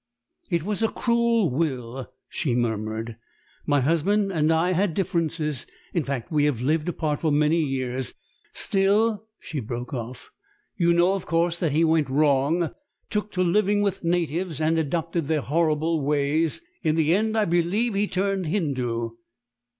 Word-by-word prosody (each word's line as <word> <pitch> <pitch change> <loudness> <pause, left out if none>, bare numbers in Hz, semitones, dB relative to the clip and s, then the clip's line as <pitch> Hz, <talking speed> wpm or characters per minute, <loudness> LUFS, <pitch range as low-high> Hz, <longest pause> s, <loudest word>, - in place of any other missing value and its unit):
"It 170 -4 0
was 210 +3 -2
a 225 - +4
cruel 235 - +1
will," 130 -4 -3 0.2
she 135 -8 -1
murmured. 110 -1 -2 0.5
"My 145 -2 +3
husband 195 +8 +2
and 155 -3 +2
I 165 +3 +2
had 185 -2 +1
differences; 160 -6 -1 0.3
in 170 - +1
fact, 135 -2 -4
we 150 -2 +3
have 145 -6 0
lived 155 +6 0
apart 155 -4 -1
for 160 - +1
many 150 +3 +3
years. 130 -3 -1 0.4
Still 205 +2 +2
" - - -62
She 155 - -3
broke 120 +2 -5
off. 125 0 -6 0.4
"You 170 -2 +3
know, 175 +2 +4
of 195 - -4
course, 170 +1 +1
that 160 -5 0
he 160 +2 +3
went 160 -3 +2
wrong 145 +4 +2 0.4
took 210 0 -2
to 185 - +1
living 205 +3 +2
with 195 -2 -1
natives 170 -1 -1
and 160 +1 +2
adopted 165 0 -1
their 155 -1 +1
horrible 155 +1 +1
ways 150 - +1 0.2
in 155 -3 +1
the 160 0 +3
end, 220 +3 +1
I 215 - +3
believe, 200 +5 +1
turned 195 -1 -1
Hindu." 125 - -1
160 Hz, 160 wpm, -25 LUFS, 140-185 Hz, 0.5 s, a